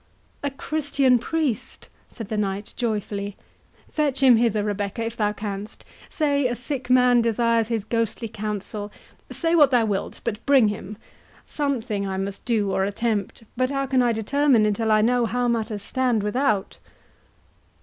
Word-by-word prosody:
"A 285 Hz, -, -1 dB
Christian 275 Hz, -3 st, +1 dB
priest!" 295 Hz, -3 st, -3 dB, 0.2 s
said 225 Hz, -4 st, -8 dB
the 220 Hz, -, -2 dB
knight, 200 Hz, 0 st, -2 dB
joyfully; 205 Hz, -3 st, -3 dB, 0.5 s
"fetch 285 Hz, -3 st, -1 dB
him 250 Hz, -3 st, +7 dB
hither, 225 Hz, -3 st, +2 dB
Rebecca, 205 Hz, +2 st, -2 dB
if 230 Hz, 0 st, -4 dB
thou 210 Hz, -2 st, +1 dB
canst—say 220 Hz, -, -3 dB
a 245 Hz, -, -2 dB
sick 255 Hz, +1 st, -5 dB
man 250 Hz, -1 st, +5 dB
desires 230 Hz, 0 st, +2 dB
his 225 Hz, -3 st, -2 dB
ghostly 230 Hz, 0 st, -1 dB
counsel—say 210 Hz, -, -5 dB
what 300 Hz, -4 st, +6 dB
thou 245 Hz, -4 st, +3 dB
wilt, 200 Hz, -3 st, -3 dB
but 220 Hz, -3 st, -3 dB
bring 265 Hz, -6 st, +5 dB
him—something 215 Hz, +2 st, -5 dB
I 190 Hz, 0 st, -3 dB
must 195 Hz, +1 st, -5 dB
do 215 Hz, -5 st, +1 dB
or 190 Hz, -, +1 dB
attempt, 205 Hz, +1 st, -2 dB
but 255 Hz, +1 st, +1 dB
how 275 Hz, 0 st, -1 dB
can 260 Hz, -1 st, +2 dB
I 240 Hz, -1 st, +3 dB
determine 235 Hz, +1 st, +2 dB
until 215 Hz, +1 st, 0 dB
I 215 Hz, 0 st, +5 dB
know 240 Hz, +1 st, +2 dB
how 245 Hz, +1 st, 0 dB
matters 220 Hz, -3 st, -1 dB
stand 245 Hz, -3 st, 0 dB
without?" 210 Hz, -2 st, 0 dB
230 Hz, 150 wpm, -24 LUFS, 210-255 Hz, 0.5 s, him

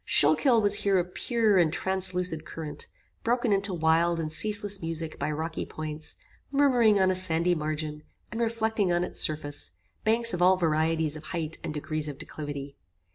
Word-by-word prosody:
Schuylkill 250 Hz, -5 st, +5 dB
was 205 Hz, -, +4 dB
here 200 Hz, -1 st, +2 dB
a 180 Hz, -, +2 dB
pure 215 Hz, +2 st, +1 dB
and 165 Hz, -3 st, +3 dB
translucid 180 Hz, -2 st, -2 dB
current, 155 Hz, -2 st, -7 dB, 0.4 s
broken 240 Hz, -1 st, +1 dB
into 200 Hz, 0 st, 0 dB
wild 165 Hz, 0 st, +2 dB
and 155 Hz, -1 st, -3 dB
ceaseless 205 Hz, +2 st, +2 dB
music 165 Hz, -1 st, -1 dB
by 145 Hz, -, -1 dB
rocky 160 Hz, +2 st, -3 dB
points, 155 Hz, 0 st, -5 dB, 0.4 s
murmuring 250 Hz, -7 st, +4 dB
on 190 Hz, 0 st, +3 dB
a -, -, 0 dB
sandy 175 Hz, -1 st, +1 dB
margin, 155 Hz, -1 st, -3 dB, 0.3 s
and 230 Hz, -, -3 dB
reflecting 220 Hz, -4 st, 0 dB
on 175 Hz, 0 st, +1 dB
its 180 Hz, -, 0 dB
surface, 150 Hz, -2 st, -1 dB, 0.3 s
banks 230 Hz, +1 st, +2 dB
of 180 Hz, -, -2 dB
all 185 Hz, +1 st, +5 dB
varieties 160 Hz, -2 st, 0 dB
of 155 Hz, 0 st, -10 dB
height 165 Hz, -2 st, -4 dB
and 155 Hz, -, -4 dB
degrees 155 Hz, +1 st, -3 dB
of 145 Hz, -2 st, -6 dB
declivity. 145 Hz, -2 st, -7 dB
175 Hz, 170 wpm, -27 LUFS, 155-205 Hz, 0.4 s, Schuylkill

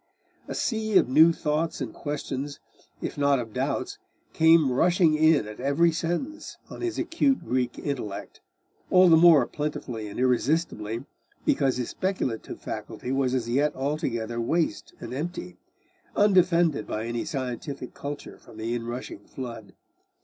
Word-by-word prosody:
A -, -, -5 dB
sea 220 Hz, -3 st, +1 dB
of -, -, +4 dB
new 160 Hz, +6 st, +6 dB
thoughts 160 Hz, 0 st, -1 dB
and -, -, -4 dB
questions, 145 Hz, -1 st, -4 dB, 0.4 s
if -, -, -4 dB
not 140 Hz, -1 st, +4 dB
of 115 Hz, -3 st, -5 dB
doubts, 145 Hz, -, -2 dB, 0.3 s
came 160 Hz, -4 st, +5 dB
rushing 170 Hz, +4 st, +3 dB
in 155 Hz, -6 st, +4 dB
at 105 Hz, -, -9 dB
every 140 Hz, +6 st, +3 dB
sentence 175 Hz, -, -3 dB
on -, -, -8 dB
his 355 Hz, -1 st, -2 dB
acute 325 Hz, -5 st, +1 dB
Greek 125 Hz, -1 st, -1 dB
intellect, 120 Hz, -9 st, -5 dB, 0.5 s
all 185 Hz, -1 st, +6 dB
the 165 Hz, -, +8 dB
more 160 Hz, -5 st, +7 dB
plentifully 145 Hz, -8 st, -4 dB
and 100 Hz, -, -7 dB
irresistibly 125 Hz, -3 st, 0 dB, 0.4 s
because 135 Hz, -3 st, +2 dB
his 125 Hz, -, -2 dB
speculative 185 Hz, -, -3 dB
faculty 125 Hz, -, -6 dB
was 135 Hz, -1 st, +1 dB
as 120 Hz, -3 st, -1 dB
yet 145 Hz, +5 st, +1 dB
altogether 120 Hz, -5 st, -2 dB
waste 155 Hz, -1 st, -1 dB
and -, -, -7 dB
empty, 175 Hz, +5 st, -5 dB, 0.6 s
undefended 175 Hz, -, +3 dB
by 110 Hz, +1 st, -3 dB
any 120 Hz, 0 st, -2 dB
scientific 130 Hz, 0 st, -5 dB
culture 145 Hz, 0 st, -7 dB
from 115 Hz, -, -16 dB
the 115 Hz, +2 st, -3 dB
inrushing 120 Hz, -3 st, -6 dB
flood. 115 Hz, -6 st, -8 dB
140 Hz, 140 wpm, -26 LUFS, 120-165 Hz, 0.6 s, the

